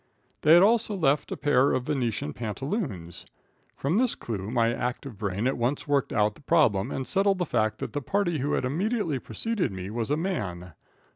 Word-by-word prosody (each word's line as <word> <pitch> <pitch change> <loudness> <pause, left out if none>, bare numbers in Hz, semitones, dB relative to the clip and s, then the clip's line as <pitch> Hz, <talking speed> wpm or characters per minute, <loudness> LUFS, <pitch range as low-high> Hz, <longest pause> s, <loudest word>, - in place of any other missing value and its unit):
They 155 +2 +7
had 175 - +7
also 220 0 +3
left 145 -5 +1
a - - -3
pair 140 -2 +3
of 125 - 0
Venetian 115 - -2
pantaloons. 115 - -4 0.5
From 160 +10 0
this 250 -1 +2
clue, 105 -3 -5
my 115 -1 +2
active 125 +1 -4
brain 100 +2 -2
at 130 -1 0
once 125 +6 -1
worked 140 -2 +1
out 105 -1 +2
the - - -19
problem 135 -11 +3
and 130 - -3
settled 195 +3 +2
the 180 - 0
fact 110 -6 0
that - - -5
the 145 - -2
party 175 +1 0
who 140 +3 -1
had - - 0
immediately 170 - -1
preceded 215 - -2
me 95 +1 -6
was 115 +1 -3
a 150 - +1
man. 95 - -3
135 Hz, 195 wpm, -27 LUFS, 110-170 Hz, 0.5 s, They